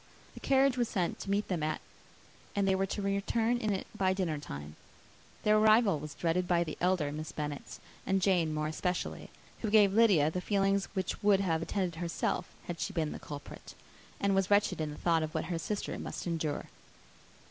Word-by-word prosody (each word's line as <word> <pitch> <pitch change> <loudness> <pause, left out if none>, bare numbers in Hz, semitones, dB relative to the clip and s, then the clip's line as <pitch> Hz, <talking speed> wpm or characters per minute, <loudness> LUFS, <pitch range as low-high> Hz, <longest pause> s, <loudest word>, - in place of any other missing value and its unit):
The - - -10
carriage 270 -1 +3
was 240 - +1
sent 180 -4 -1
to - - -6
meet 200 +1 +1
them 180 -4 -1
at, 155 0 -1 0.8
and 200 -1 +2
they 190 - +4
were 190 +1 +1
to 200 +1 -3
return 220 +4 +1
in 215 -3 0
it 190 - -2
by 190 -1 +2
dinnertime. 145 - -4 0.7
Their 215 0 +5
arrival 215 -5 +5
was 150 0 -8
dreaded 175 +3 0
by 175 -1 +3
the 155 -3 -5
elder 175 -5 +2
Miss 155 +1 -5
Bennets 150 -2 -5 0.2
and 195 0 +1
Jane 180 -4 +2
more 155 0 -1
especially, 180 +4 -3 0.3
who 220 - -1
gave 205 -2 +5
Lydia 195 -9 +5
the 180 - -3
feelings 195 0 +1
which 190 -2 -2
would 200 -1 +4
have 165 -4 0
attended 180 -1 -2
herself, 175 0 -1 0.2
had 175 -1 -5
she 200 - -2
been 160 -4 -1
the - - -6
culprit, 145 -1 -9 0.4
and 200 0 +2
was 195 0 +2
wretched 205 -5 +3
in 155 - -1
the 150 - -7
thought 165 -2 +2
of 155 0 -4
what - - -1
her 165 - -1
sister 205 +6 -3
must - - -5
endure. 160 -4 -2
185 Hz, 195 wpm, -31 LUFS, 160-200 Hz, 0.8 s, Their